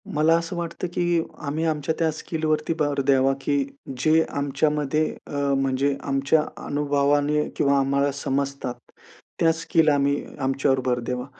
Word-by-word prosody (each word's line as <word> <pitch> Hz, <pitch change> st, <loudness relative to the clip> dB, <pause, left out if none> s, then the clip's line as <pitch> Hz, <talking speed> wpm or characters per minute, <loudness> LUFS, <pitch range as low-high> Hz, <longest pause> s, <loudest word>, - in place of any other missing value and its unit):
मला 155 Hz, +2 st, +4 dB
असं 170 Hz, +2 st, -4 dB
वाटतं 170 Hz, +1 st, -4 dB
की 175 Hz, -1 st, +1 dB, 0.3 s
आम्ही 155 Hz, +3 st, -1 dB
आमच्या 155 Hz, -1 st, 0 dB
त्या 165 Hz, -1 st, +2 dB
स्किलवरती 155 Hz, 0 st, -1 dB
भर 145 Hz, -2 st, +1 dB
द्यावा 135 Hz, -1 st, +4 dB
की 145 Hz, +1 st, 0 dB, 0.5 s
जे 160 Hz, +1 st, +5 dB
आमच्यामध्ये 145 Hz, +1 st, 0 dB, 0.2 s
अ, -, -, -9 dB, 0.2 s
म्हणजे 135 Hz, +1 st, +1 dB
आमच्या 140 Hz, +3 st, +2 dB, 0.2 s
अनुभवाने 145 Hz, +1 st, +1 dB
किंवा 140 Hz, 0 st, +3 dB
आम्हाला 140 Hz, +1 st, +1 dB
समजतात 140 Hz, -2 st, -2 dB, 0.7 s
त्या 165 Hz, -, +4 dB
स्किल 165 Hz, 0 st, +1 dB
आम्ही 140 Hz, 0 st, +1 dB, 0.2 s
आमच्यावर 135 Hz, 0 st, +1 dB
भर 125 Hz, -1 st, +1 dB
द्यावा. 125 Hz, +1 st, -3 dB
145 Hz, 135 wpm, -24 LUFS, 140-155 Hz, 0.7 s, जे